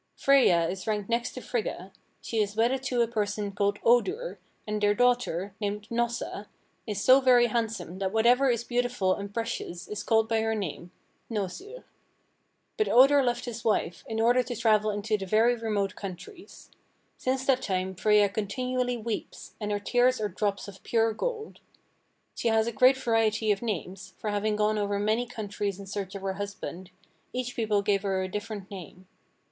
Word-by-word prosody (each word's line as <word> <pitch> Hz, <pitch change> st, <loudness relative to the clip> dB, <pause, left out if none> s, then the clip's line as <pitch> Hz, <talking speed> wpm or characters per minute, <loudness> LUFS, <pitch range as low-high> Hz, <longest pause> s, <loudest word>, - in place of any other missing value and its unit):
Freyja 215 Hz, -12 st, +4 dB
is 185 Hz, +3 st, -5 dB
ranked 210 Hz, -2 st, -1 dB
next 235 Hz, +1 st, 0 dB
to 255 Hz, -, -7 dB
Frigga: 200 Hz, -6 st, -4 dB, 0.3 s
she 225 Hz, -, -2 dB
is 205 Hz, -1 st, 0 dB
wedded 240 Hz, +4 st, +2 dB
to 250 Hz, -3 st, +1 dB
a -, -, -1 dB
person 210 Hz, -2 st, -2 dB
called 200 Hz, 0 st, 0 dB
Odur, 375 Hz, -, +2 dB, 0.3 s
and 210 Hz, 0 st, -3 dB
their 205 Hz, 0 st, +3 dB
daughter, 245 Hz, -6 st, +1 dB
named 205 Hz, 0 st, -3 dB
Hnossa, 235 Hz, -3 st, -2 dB, 0.4 s
is 210 Hz, -2 st, -2 dB
so 260 Hz, +6 st, +6 dB
very 250 Hz, -2 st, +6 dB
handsome 225 Hz, -6 st, -2 dB
that 190 Hz, -1 st, -1 dB
whatever 245 Hz, +5 st, +4 dB
is 235 Hz, -1 st, 0 dB
beautiful 245 Hz, -6 st, 0 dB
and 200 Hz, +1 st, -6 dB
precious 225 Hz, -6 st, -4 dB
is 210 Hz, -, -5 dB
called 220 Hz, -1 st, +2 dB
by 225 Hz, -1 st, +1 dB
her 225 Hz, 0 st, 0 dB
name 180 Hz, -3 st, -5 dB, 0.4 s
(hnosir.) 245 Hz, -, -5 dB, 0.9 s
But 430 Hz, -, +1 dB
Odur 275 Hz, +3 st, +6 dB
left 245 Hz, -1 st, -1 dB
his 230 Hz, -2 st, -6 dB
wife 210 Hz, -6 st, 0 dB
in 225 Hz, 0 st, -3 dB
order 240 Hz, +3 st, +4 dB
to 245 Hz, -1 st, -5 dB
travel 215 Hz, -1 st, +3 dB
into 210 Hz, 0 st, -1 dB
very 220 Hz, +5 st, +3 dB
remote 210 Hz, -4 st, -1 dB
countries. 210 Hz, -, -10 dB, 0.5 s
Since 260 Hz, +1 st, -1 dB
that 260 Hz, -1 st, +3 dB
time 190 Hz, -3 st, -2 dB
Freyja 210 Hz, +2 st, +3 dB
continually 250 Hz, +4 st, -1 dB
weeps, 225 Hz, -1 st, -6 dB
and 210 Hz, -, -2 dB
her 205 Hz, -, 0 dB
tears 245 Hz, +4 st, +2 dB
are 210 Hz, -1 st, -1 dB
drops 200 Hz, +2 st, -2 dB
of 195 Hz, -1 st, -11 dB
pure 225 Hz, -1 st, +1 dB
gold. 440 Hz, -, -4 dB, 0.7 s
She -, -, -2 dB
has 220 Hz, -1 st, +3 dB
a 235 Hz, -, -2 dB
great 255 Hz, +4 st, +5 dB
variety 225 Hz, -3 st, +1 dB
of 200 Hz, -, 0 dB
names, 190 Hz, -3 st, -5 dB
for 210 Hz, -, -3 dB
having 210 Hz, +1 st, 0 dB
gone 210 Hz, 0 st, +1 dB
over 205 Hz, 0 st, -1 dB
many 215 Hz, +4 st, 0 dB
countries 205 Hz, -4 st, -4 dB
in 200 Hz, -, -8 dB
search 195 Hz, 0 st, -5 dB
of 195 Hz, -, -7 dB
her 195 Hz, -1 st, -1 dB
husband, 190 Hz, -2 st, -6 dB, 0.4 s
each 250 Hz, -1 st, -3 dB
people 210 Hz, -3 st, +1 dB
gave 200 Hz, -1 st, +2 dB
her 190 Hz, -2 st, -1 dB
a -, -, -2 dB
different 205 Hz, 0 st, -6 dB
name. 185 Hz, -1 st, -10 dB
215 Hz, 175 wpm, -28 LUFS, 200-240 Hz, 0.9 s, so